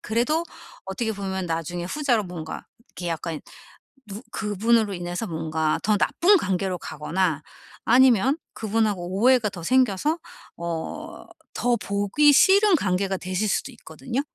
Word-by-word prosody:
그래도 275 +10 0 0.4
어떻게 220 +4 -3
보면 190 -2 -4
나중에 165 +1 -3
후자로 245 0 0
뭔가 170 -3 -7 0.2
이렇게 175 -1 -6
약간 165 -1 -4 0.7
누 205 +3 -8
그분으로 215 0 +1
인해서 175 +4 -4
뭔가 160 -2 -1
더 210 0 +2
나쁜 385 - +4
관계로 190 - -1
가거나 160 0 -2 0.4
아니면 260 +1 +5 0.2
그분하고 210 -5 -1
오해가 250 -3 +4
더 180 -4 -9
생겨서 260 - +2 0.4
어 170 -1 -5 0.3
더 245 -1 +2
보기 205 +8 +2
싫은 400 +3 +6
관계가 190 - 0
되실 185 +4 -2
수도 - - -1
있거든요. 255 +2 -5
200 Hz, 295 characters per minute, -24 LUFS, 175-245 Hz, 0.7 s, 싫은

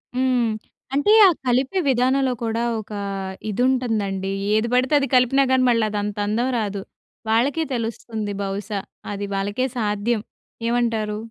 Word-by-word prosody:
హ్మ్. 250 -3 +2 0.4
అంటే, 290 +10 +4
ఆ - - +6 0.2
కలిపే 260 +9 +1
విధానంలో 260 +1 +2
కూడా 225 0 -1 0.2
ఒక 215 - -16 0.6
ఇది 210 +3 -2
ఉంటందండి. 210 -7 -1 0.2
ఏది 220 +2 +2
పడితే 255 +3 +2
అది 275 - 0
కలిపినా 255 +2 +4
గాని, 260 -1 +4
మళ్ళదంతందం 210 +1 0
రాదు. 205 -2 -3 0.5
వాళ్ళకే 265 +8 +2
తెలుస్తుంది 225 -3 -3
బహుశా. 200 +1 -3 0.3
అది 205 0 -4
వాళ్ళకే 205 +6 -1
సాధ్యం. 210 +1 0 0.5
ఏమంటారు? 230 -3 0
230 Hz, 120 wpm, -22 LUFS, 210-255 Hz, 0.6 s, ఆ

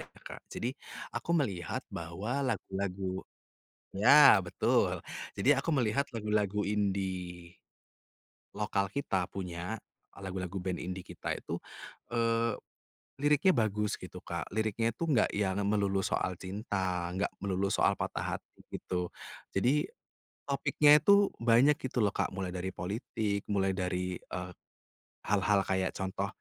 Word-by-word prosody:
ya, - - -8 0.2
Kak, - - -8
jadi 120 +2 -3 0.4
aku - - -4
melihat 100 - -2
bahwa 95 +11 -3
lagu-lagu 95 -6 -2 0.7
ya 120 +2 +8
betul, 90 -2 +1 0.3
jadi 135 +7 +4
aku 160 +2 0
melihat 130 +2 +1
lagu-lagu 105 -2 0
indi, 95 -4 -2 1.0
lokal 100 -2 -1
kita 95 -10 0
punya, 90 +3 -4 0.4
lagu-lagu 95 -1 -4
band 90 0 -2
indie 90 0 -5
kita - - -4
itu, - - -4 0.6
eee, 115 -1 +1 0.7
liriknya 150 +6 +4
bagus 105 - 0
gitu, - - -9
Kak, - - -4
liriknya 110 +2 0
itu 170 - -2
enggak 135 -9 +3
yang 100 -1 +1
melulu 100 -2 +2
soal 95 -1 -1
cinta, 95 -3 -2
enggak 95 +2 0
melulu 100 0 -1
soal - - +3
patah - - -2
hati - - -23
gitu, 90 -1 -3 0.4
jadi 125 +9 +2 0.6
topiknya 145 +2 +5
itu 200 +5 +5
banyak 120 +5 +5
gitu 130 -2 -2
loh, 105 - +4
Kak. - - -2
Mulai 95 -1 -3
dari 90 +1 -4
politik, 105 +1 -2
mulai 95 -2 +1
dari, 90 -1 -2
eee, 90 0 -6 0.7
hal-hal 100 0 +3
kayak 95 -1 +1
contoh 95 +1 -2
100 Hz, 125 wpm, -31 LUFS, 95-115 Hz, 1.0 s, ya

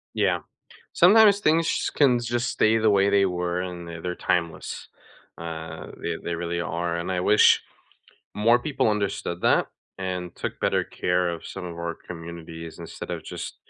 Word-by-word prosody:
Yeah. - - +2 0.5
Sometimes 205 +2 +7
things 165 -2 +3
sh - - 0
can 130 -5 +3
just 120 +1 -1
stay 110 +1 +3
the 110 -1 +3
way 100 0 +4
they 100 -1 +4
were 90 -1 -1
and 90 -2 -6
th 85 -1 -7
they're 90 0 -2
timeless, 85 -3 -2 0.5
uh, 80 -1 -7
they 85 -1 -2
they 85 - -2
really 85 0 -2
are, 85 0 -2
and 85 +2 -3
I 90 - 0
wish 105 +4 +5 0.8
more 115 +3 +4
people 140 -5 0
understood 100 -4 -2
that, - - +3 0.3
and 90 -2 -4
took - - -5
better - - +1
care 90 0 0
of 85 - -7
some - - -7
of 85 -1 -6
our 85 0 -3
communities 85 -1 -8
instead 85 -1 -8
of - - -5
just - - -7
90 Hz, 170 wpm, -25 LUFS, 85-105 Hz, 0.8 s, Sometimes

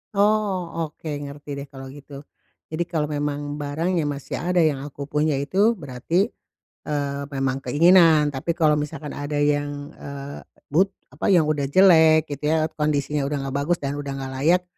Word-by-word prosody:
Oh, 200 -6 +1
oke, 155 +2 -13
ngerti 145 0 -9
deh 140 - -7
kalau 135 -1 -10
gitu. 140 0 -11 0.5
Jadi 160 +2 -1
kalau 155 -3 -1
memang 145 0 -3
barangnya 160 +3 -1
masih 140 -1 -4
ada 180 +4 +1
yang 150 -4 +1
aku 140 0 -7
punya 150 +1 0
itu 195 +12 +2
berarti, 165 - -1 0.6
eee, 140 -2 -2
memang 135 0 -1
keinginan. 165 -1 +5
Tapi 135 +5 -3
kalau 155 -3 +4
misalkan 150 0 -4
ada 145 +1 -3
yang, 145 0 -1
eee, 140 0 -8 0.3
but 185 +7 +3 0.2
apa, - - 0
yang 170 -5 +5
udah 150 -2 0
jelek, 160 -3 +6
gitu 150 +2 -2
ya, 160 0 +2
kondisinya 150 -1 0
udah 145 +1 -2
enggak 135 +1 -3
bagus 175 +3 +1
dan 140 0 -3
udah 145 -1 -5
enggak 135 0 -5
layak, 180 +3 +4
150 Hz, 165 wpm, -23 LUFS, 145-165 Hz, 0.6 s, jelek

